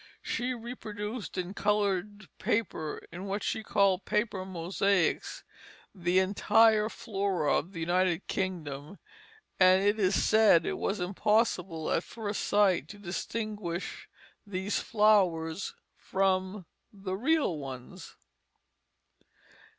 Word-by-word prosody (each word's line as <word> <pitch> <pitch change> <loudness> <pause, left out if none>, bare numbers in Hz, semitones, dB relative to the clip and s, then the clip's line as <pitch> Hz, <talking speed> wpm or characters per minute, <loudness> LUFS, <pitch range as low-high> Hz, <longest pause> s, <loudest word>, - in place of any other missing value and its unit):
She 250 +1 -2
reproduced 220 -2 -6
in 180 +1 -3
colored 205 0 0
paper, 175 -8 -2
in 180 +3 -7
what 200 +1 -3
she - - -1
called 200 -3 +2
"paper 210 -3 -1
mosaics," 185 +1 0 0.5
the 180 -2 0
entire 210 +3 +4
flora 195 -9 -1
of 170 - -4
the 165 -4 -6
United 180 +1 +1
Kingdom, 170 -3 -4 0.6
and 185 +1 +6
it 205 +2 +2
is 195 -1 +2
said 215 -7 +5
it - - -2
was 200 - -1
impossible 185 -3 0
at 165 - +1
first 210 -3 -4
sight 195 -7 +3
to 205 - -10
distinguish 200 -1 -5 0.3
these 200 0 -2
flowers 190 -6 +2 0.2
from 190 0 0 0.3
the 195 -2 -5
real 265 - +1
ones. 130 -3 -9
195 Hz, 110 wpm, -29 LUFS, 180-210 Hz, 0.6 s, and